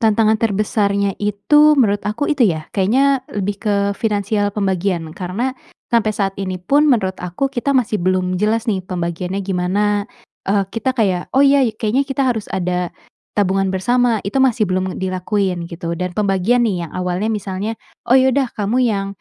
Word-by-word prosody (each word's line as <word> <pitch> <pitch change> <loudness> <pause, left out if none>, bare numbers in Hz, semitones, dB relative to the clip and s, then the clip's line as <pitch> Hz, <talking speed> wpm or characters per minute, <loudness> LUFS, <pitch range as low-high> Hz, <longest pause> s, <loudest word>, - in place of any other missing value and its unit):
tantangan 220 -1 +3
terbesarnya 200 -2 0
itu, 295 +10 +4
menurut 205 -5 +2
aku 215 +7 -2
itu 280 -5 +3
ya 160 -4 -2
kayaknya 260 +7 +2
lebih 205 0 -2
ke 210 -2 +1 0.2
finansial 205 -1 0
pembagian 190 -4 -1
karena 195 +9 -2 0.4
sampai 220 -2 +2
saat 195 -1 -1
ini 185 -1 -3
pun, 285 +11 +3
menurut 190 -7 +1
aku, 180 +10 -2
kita 275 +2 -1
masih 225 -7 +1
belum 185 0 +1
jelas 220 +2 +1
nih 190 -4 0
pembagiannya 180 +1 -3
gimana, 185 +2 0 0.6
eee, 200 0 +2
kita 240 +3 -1
kayak, 190 -6 0
"Oh 265 - +3
iya 275 -5 +4
kayaknya 225 +5 +1
kita 270 0 0
harus 230 -5 -2
ada 180 -1 -1 0.5
tabungan 195 -1 +2
bersama." 240 +4 +1
Itu 260 +7 +1
masih 240 -5 +2
belum 185 0 -2
dilakuin, 185 -1 -1
gitu, 170 0 -4
dan 180 +1 -3
pembagian 210 +4 +2
nih 180 -5 -1
yang - - -18
awalnya 180 +4 -1
misalnya, 205 +1 -3 0.3
"Oh 260 - +7
ya 260 -1 +3
udah, 270 -3 +1
kamu 225 +5 +1
yang, 205 -5 0
205 Hz, 165 wpm, -18 LUFS, 185-230 Hz, 0.6 s, Oh